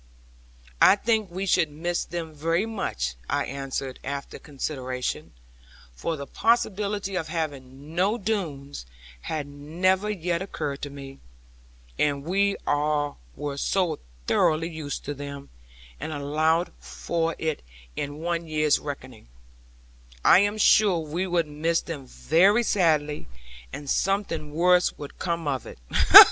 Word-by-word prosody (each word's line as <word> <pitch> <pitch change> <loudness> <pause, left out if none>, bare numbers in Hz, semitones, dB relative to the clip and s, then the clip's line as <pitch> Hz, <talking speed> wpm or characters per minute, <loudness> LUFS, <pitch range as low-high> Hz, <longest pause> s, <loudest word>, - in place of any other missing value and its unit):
'I - - +8
think 220 -1 0
we 185 +3 -3
should 175 -4 +3
miss 170 +4 -2
them 165 -2 -5
very 165 +6 0
much,' 65 - -2 0.2
I - - +1
answered 135 -1 -4
after 140 +1 -5
consideration; 130 -3 -4 0.6
for 165 - -3
the 140 - -6
possibility 205 -1 0
of 165 -3 -2
having 145 -3 -5
no 195 +6 +2
Doones 155 - -3 0.3
had 155 - -3
never 175 +8 0
yet 175 -4 -1
occurred 150 -7 -4
to 145 - -4
me, 135 -1 -10 0.8
and 140 -2 +1
we 200 +4 +2
all 145 0 0 0.2
were 145 -1 -4
so 175 0 0 0.3
thoroughly 160 - +2
used 155 -4 -5
to 145 - -3
them, 140 0 -8 0.5
and - - -4
allowed 155 +4 +1
for 165 -1 -2
it 160 -2 -2 0.3
in 145 +3 -4
our 170 0 +1
year's 155 -2 +1
reckoning; 130 - -8 1.0
'I - - +8
am 205 +2 +1
sure 205 -3 +5
we 165 +3 -2
should 175 -2 +1
miss 160 +3 0
them 145 -6 -7
very 195 - +4
sadly; 155 -8 +1 0.4
and 145 - -7
something 180 -3 0
worse 180 +3 +3
would 145 -1 -9
come 170 -3 -2
of 135 -3 -2
it.' - - -10
160 Hz, 130 wpm, -26 LUFS, 145-180 Hz, 1.0 s, I